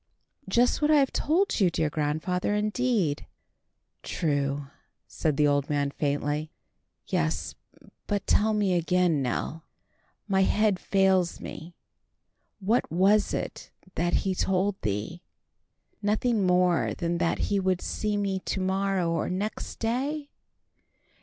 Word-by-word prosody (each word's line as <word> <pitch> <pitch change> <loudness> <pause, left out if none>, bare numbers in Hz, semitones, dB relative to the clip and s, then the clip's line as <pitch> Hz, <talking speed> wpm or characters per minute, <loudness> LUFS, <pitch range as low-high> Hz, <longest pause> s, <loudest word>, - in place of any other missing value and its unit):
"Just 240 +8 +3
what 300 - +3
I 310 - +6
have 275 -2 +3
told 350 +4 +1
you, 190 -4 +4
dear 155 -2 -1
grandfather, 160 +6 -1
indeed." 210 - 0 0.7
"True," 145 -3 -1 0.4
said 155 -4 -2
the 150 - +4
old 145 -1 +1
man 145 -1 0
faintly. 145 +2 -1 0.6
"Yes. 80 0 -1 0.5
But 205 -1 -1
tell 215 +1 +3
me 200 -3 +2
again, 175 -3 +2
Nell. 135 +5 -3 0.6
My 190 -2 +2
head 205 0 +2
fails 190 -3 +2
me. 170 +3 -9 0.8
What 215 +1 +1
was 195 +5 +3
it - - -4 0.2
that 175 +1 0
he 190 - +1
told 190 +1 0
thee? 110 - -3 0.8
Nothing 210 0 +1
more 180 -1 +2
than 170 0 -2
that 170 -1 +1
he 200 - +3
would 185 -1 +1
see 210 +2 -2
me 195 -2 -1
to 190 - -3
morrow 190 -2 0
or 165 -1 -1
next 200 +4 -4
day? 280 +6 -2
185 Hz, 125 wpm, -27 LUFS, 160-205 Hz, 0.8 s, I